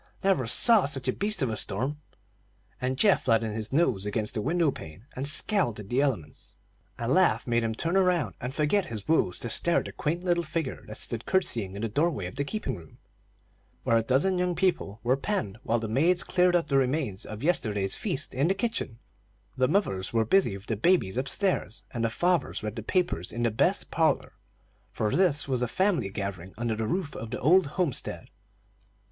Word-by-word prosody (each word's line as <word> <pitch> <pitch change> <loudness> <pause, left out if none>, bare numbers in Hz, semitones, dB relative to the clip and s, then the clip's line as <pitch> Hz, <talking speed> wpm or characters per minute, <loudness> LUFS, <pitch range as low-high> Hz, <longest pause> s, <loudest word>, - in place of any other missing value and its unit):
Never 190 -11 +2
saw 225 - +5
such 135 -2 -3
a 130 - +2
beast 205 -6 0
of 125 - 0
a - - -2
storm!" 130 +10 -2 0.8
and 130 +1 -1
Geoff 200 +5 +3
flattened 115 -3 +2
his 110 0 -3
nose 130 - +2
against 105 +1 -2
the 110 - -2
window 160 +3 +1
pane 90 +1 -11
and 135 +2 -2
scowled 150 - +2
at 105 -1 -9
the 125 +3 +2
elements. 110 - -3 0.4
A 115 - -3
laugh 180 +8 +3
made 120 -1 +1
him 110 -1 -2
turn 165 +8 -1
around, 180 -4 +2
and 125 - -3
forget 155 +8 +1
his 110 -3 -6
woes 155 - +2
to - - -4
stare 170 +9 +2
at - - 0
the - - -6
quaint 170 +4 -2
little 175 -1 +1
figure 155 -3 -4
that 110 - -6
stood 115 -1 -1
curtseying 115 - 0
in 100 - -5
the - - +1
door 145 +10 +1
way 105 - -4
of 90 - -7
the 140 - -1
keeping 145 - -3
room, 80 -5 -14 0.9
where 115 - +2
a - - +3
dozen 140 +11 +1
young 180 -1 0
people 170 - 0
were 125 +2 +3
penned 135 - -3
while 120 -2 0
the 110 -1 -3
maids 160 +11 +2
cleared 180 -1 +2
up 170 - +2
the 140 -2 +1
remains 130 -6 0
of 110 +3 -8
yesterday's 105 - +1
feast 170 -8 -2
in 135 +5 +1
the 190 - +1
kitchen, 210 - -2 0.6
the 130 0 +2
mothers 130 - 0
were 115 -1 +1
busy 115 - +2
with 100 - -14
the 110 - -2
babies 115 - +2
upstairs, 135 - -1
and 115 - -3
the 115 - +2
fathers 175 +1 0
read 110 +1 -5
papers 175 - 0
in 120 +2 -3
the 115 - +2
best 110 - 0
parlor; - - +1 0.6
for 105 -1 -1
this 165 -7 +3
was 130 -3 -1
a 125 - +1
family 180 - +1
gathering 95 -2 -6
under 115 -1 -1
the 110 0 -2
roof 170 - -2
of 115 - -6
the 125 - -4
old 170 +4 +5
homestead. 175 -9 -2
130 Hz, 205 wpm, -27 LUFS, 110-175 Hz, 0.9 s, saw